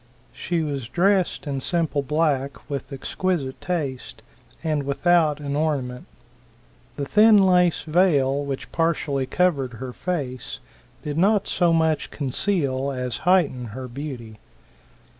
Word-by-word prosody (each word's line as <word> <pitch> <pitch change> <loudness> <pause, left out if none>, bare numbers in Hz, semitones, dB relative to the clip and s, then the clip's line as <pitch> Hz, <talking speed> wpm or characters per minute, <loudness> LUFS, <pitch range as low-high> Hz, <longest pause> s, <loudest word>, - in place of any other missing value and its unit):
She 170 -2 -2
was 140 -5 -3
dressed 190 -1 +1
in 140 -2 -3
simple 160 -2 0
black, 140 -2 -1
with 140 -1 -5
exquisite 140 0 -2
taste, 150 -8 -4 0.4
and 155 -2 0
without 150 +2 +2
an 140 -1 -3
ornament. 140 -5 -2 0.9
The 140 - -3
thin 215 +6 +6
lace 180 -3 +4
vail 145 -5 +2
which 140 -2 -5
partially 150 -5 0
covered 140 -9 +1
her 125 +2 -7
face 140 -8 -4 0.5
did 150 +1 -3
not 205 +2 +3
so 175 -2 +2
much 160 -1 +1
conceal 140 -2 -1
as 125 -2 -3
heighten 145 -10 +3
her 130 -1 -5
beauty. 120 -5 -7
150 Hz, 120 wpm, -23 LUFS, 135-175 Hz, 0.9 s, thin